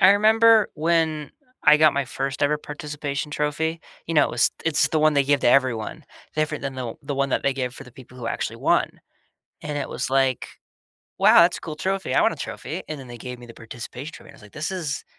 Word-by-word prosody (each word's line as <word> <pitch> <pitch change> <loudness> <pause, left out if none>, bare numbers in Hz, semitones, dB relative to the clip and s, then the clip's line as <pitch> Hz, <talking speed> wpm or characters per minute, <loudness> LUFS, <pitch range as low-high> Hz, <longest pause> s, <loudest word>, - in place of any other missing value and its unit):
I 185 - +8
remember 220 +2 +5
when 160 -1 0 0.3
I 150 - +7
got 155 -1 +5
my 140 0 0
first 135 +2 -4
ever 150 +1 +2
participation 150 -1 -5
trophy. 155 +2 -2 0.3
You 165 - -3
know, 150 -2 +6
it - - -2
was 120 - +2
it's 160 -3 +3
the 160 - 0
one 155 0 +3
they 140 - +4
give 145 0 +2
to - - +3
everyone, 125 -4 +1 0.3
different 155 -1 -1
than 140 -1 -4
the 125 -3 -5
the 140 0 -4
one 140 0 0
that - - 0
they 140 - +2
give 125 -2 -3
for 135 - -10
the 125 - -15
people 125 0 -14
who 120 - -6
actually - - -3
won. - - +1 0.6
And 150 -1 -4
it 140 - -3
was 125 - -3
like, 135 -1 +1 0.7
"Wow, - - +7
that's 175 +1 +2
a - - -14
cool 155 -2 -7
trophy. 190 +3 -2
I - - +4
want - - +3
a - - -7
trophy." - - -6
And 155 - -5
then 130 -2 -11
they 120 0 -9
gave 125 +1 -7
me 120 - -12
the 115 - -12
participation 125 +6 -8
trophy. - - -13
I - - -17
was - - -18
like, 105 - -15
"This 150 +3 -4
is 170 -6 -4
145 Hz, 240 wpm, -23 LUFS, 130-155 Hz, 0.7 s, I